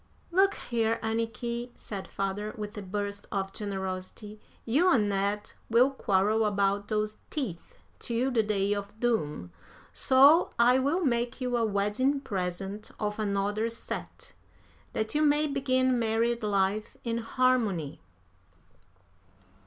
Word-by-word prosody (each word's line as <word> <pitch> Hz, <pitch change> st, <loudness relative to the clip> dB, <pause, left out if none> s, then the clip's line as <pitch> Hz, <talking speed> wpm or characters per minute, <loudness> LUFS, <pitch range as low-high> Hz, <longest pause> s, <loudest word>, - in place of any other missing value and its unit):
"Look 390 Hz, +3 st, +4 dB
here, 230 Hz, -1 st, -1 dB
Anniky," 230 Hz, +2 st, -2 dB
said 195 Hz, -3 st, -7 dB
father, 200 Hz, +2 st, -3 dB
with 210 Hz, +1 st, -6 dB
a 210 Hz, -, -5 dB
burst 200 Hz, +1 st, -4 dB
of 195 Hz, -1 st, -2 dB
generosity, 195 Hz, +1 st, -5 dB, 0.3 s
"you 310 Hz, +11 st, +3 dB
and 215 Hz, -8 st, +3 dB
Ned 200 Hz, +1 st, -1 dB, 0.2 s
will 245 Hz, +4 st, +5 dB
quarrel 210 Hz, -3 st, +2 dB
about 200 Hz, -1 st, +1 dB
those 215 Hz, 0 st, -1 dB
teeth 220 Hz, -, -5 dB, 0.2 s
till 245 Hz, +3 st, -1 dB
the 235 Hz, -3 st, +3 dB
day 205 Hz, -1 st, 0 dB
of 205 Hz, +1 st, -6 dB
doom, 150 Hz, -, -1 dB, 0.4 s
so 280 Hz, +6 st, +6 dB
I 245 Hz, +2 st, +5 dB
will 310 Hz, +7 st, +1 dB
make 240 Hz, -1 st, 0 dB
you 250 Hz, -1 st, -1 dB
a 235 Hz, -, +2 dB
wedding 215 Hz, +7 st, +1 dB
present 195 Hz, -2 st, -4 dB
of 210 Hz, 0 st, -2 dB
another 205 Hz, +2 st, 0 dB
set, 230 Hz, -, -7 dB, 0.6 s
that 220 Hz, 0 st, -2 dB
you 300 Hz, -, +2 dB
may 300 Hz, 0 st, +4 dB
begin 260 Hz, -3 st, +1 dB
married 230 Hz, +1 st, +1 dB
life 205 Hz, 0 st, 0 dB
in 235 Hz, -1 st, -1 dB
harmony." 225 Hz, -, 0 dB
220 Hz, 130 wpm, -29 LUFS, 200-245 Hz, 0.6 s, so